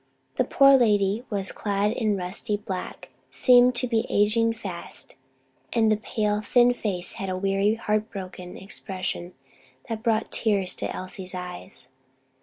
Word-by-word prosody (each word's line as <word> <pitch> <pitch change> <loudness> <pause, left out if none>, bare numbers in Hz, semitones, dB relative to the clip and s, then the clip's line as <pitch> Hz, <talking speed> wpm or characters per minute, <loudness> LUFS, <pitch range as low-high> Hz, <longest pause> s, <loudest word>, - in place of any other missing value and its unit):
The - - +4
poor 275 0 +6
lady 210 -1 +2
was 200 -2 -2
clad 205 0 0
in 215 -3 0
rusty 195 +4 -2
black, 190 -3 -6 0.2
seemed 250 -1 +5
to 250 - +1
be 230 -2 0
aging 225 +3 +3
fast, 190 -6 -4 0.6
and 225 -2 +3
the 215 - +3
pale, 210 -1 -1
thin 245 +3 +4
face 195 -7 -1
had 195 - -3
a 185 - -2
weary, 195 +2 +1
heart 215 -1 -1
broken 185 -2 -8
expression 185 -2 -6 0.5
that 225 -1 -3
brought 225 -1 0
the - - 0
tears 200 -5 +1
to - - -3
Elsie's 185 0 -7
eyes. 180 -6 -6
205 Hz, 150 wpm, -25 LUFS, 190-225 Hz, 0.6 s, poor